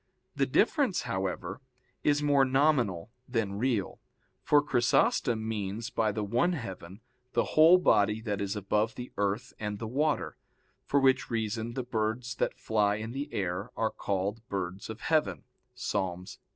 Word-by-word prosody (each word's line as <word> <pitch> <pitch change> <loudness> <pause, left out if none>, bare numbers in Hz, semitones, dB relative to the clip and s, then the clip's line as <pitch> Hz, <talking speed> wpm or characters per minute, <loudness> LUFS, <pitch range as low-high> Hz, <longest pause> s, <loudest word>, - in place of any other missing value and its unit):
The - - +1
difference, 270 - +2
however, 95 -2 -3 0.4
is 145 0 +2
more 145 -2 +4
nominal 130 - +2 0.2
than 105 -5 -1
real. 115 -6 -1 0.4
For 145 0 +4
Chrysostom 120 -4 +2
means 110 +2 -3
by 110 -4 +1
the 105 +1 -3
one 120 - +1
heaven 95 - -7 0.3
the - - +3
whole 160 +4 +8
body 105 - +3
that 105 -3 -3
is 100 +1 -2
above 105 +2 0
the 125 0 -7
earth 100 +5 -1
and 105 -1 -3
the 115 - -5
water, 125 - -1 0.5
for 140 - +3
which 130 -1 +3
reason 115 +1 -2
the 130 - -2
birds 115 +1 -2
that - - -1
fly 105 -2 +1
in 110 +2 -5
the 140 +3 -5
air 95 +3 -2
are 110 - +1
called 100 +3 -2
birds 95 0 -4
of 110 +1 -7
heaven 155 -1 +1 0.3
[*Ps. 125 -3 -4
110 Hz, 150 wpm, -29 LUFS, 100-130 Hz, 0.5 s, whole